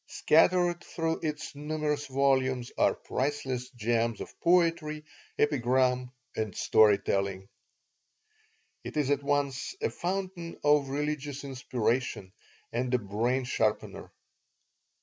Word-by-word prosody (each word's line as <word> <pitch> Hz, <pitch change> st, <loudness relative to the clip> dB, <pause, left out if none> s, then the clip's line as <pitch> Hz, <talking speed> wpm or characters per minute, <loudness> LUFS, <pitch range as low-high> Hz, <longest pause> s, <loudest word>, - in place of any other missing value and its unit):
Scattered 175 Hz, +2 st, +3 dB
through 165 Hz, -1 st, -2 dB
its 150 Hz, -1 st, -4 dB
numerous 150 Hz, 0 st, -2 dB
volumes 130 Hz, -2 st, +1 dB
are -, -, +3 dB
priceless 130 Hz, -2 st, -3 dB
gems 115 Hz, -1 st, 0 dB
of -, -, -7 dB
poetry, 165 Hz, -3 st, +2 dB, 0.3 s
epigram, 125 Hz, -3 st, +2 dB, 0.3 s
and 110 Hz, -4 st, -3 dB
story 105 Hz, -2 st, +5 dB
telling 95 Hz, -1 st, -2 dB, 1.4 s
It -, -, -6 dB
is 145 Hz, -2 st, +1 dB
at 140 Hz, 0 st, +2 dB
once 140 Hz, -, -1 dB
a 455 Hz, -, -1 dB
fountain 180 Hz, -2 st, -4 dB
of 145 Hz, -2 st, +4 dB
religious 145 Hz, 0 st, -3 dB
inspiration 125 Hz, -6 st, -2 dB, 0.4 s
and 125 Hz, +1 st, -1 dB
a -, -, +4 dB
"brain 120 Hz, +5 st, -1 dB
sharpener." 110 Hz, -3 st, -1 dB
135 Hz, 110 wpm, -29 LUFS, 120-150 Hz, 1.4 s, story